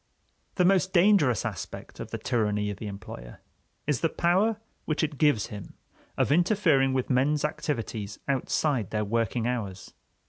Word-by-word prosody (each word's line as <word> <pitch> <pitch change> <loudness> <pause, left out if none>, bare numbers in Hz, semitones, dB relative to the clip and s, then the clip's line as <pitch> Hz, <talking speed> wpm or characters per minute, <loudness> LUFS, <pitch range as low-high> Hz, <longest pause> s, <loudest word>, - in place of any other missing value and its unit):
The 180 - +3
most 190 0 +3
dangerous 175 - +4
aspect 100 -9 -6
of - - -6
the - - -4
tyranny 105 -3 0
of 100 - -7
the 105 - -6
employer 80 -11 -9 0.5
is 145 -5 0
the 165 - +2
power 195 +8 +2 0.3
which 155 0 0
it 150 -3 -2
gives 145 -10 +3
him 100 -2 -9 0.4
of - - +2
interfering 165 -6 +3
with 130 +1 -1
men's 145 +4 +2
activities 115 -8 -3
outside 135 - 0
their 105 -1 -1
working 115 +1 0
hours. 110 -6 -4
130 Hz, 150 wpm, -27 LUFS, 105-160 Hz, 0.5 s, dangerous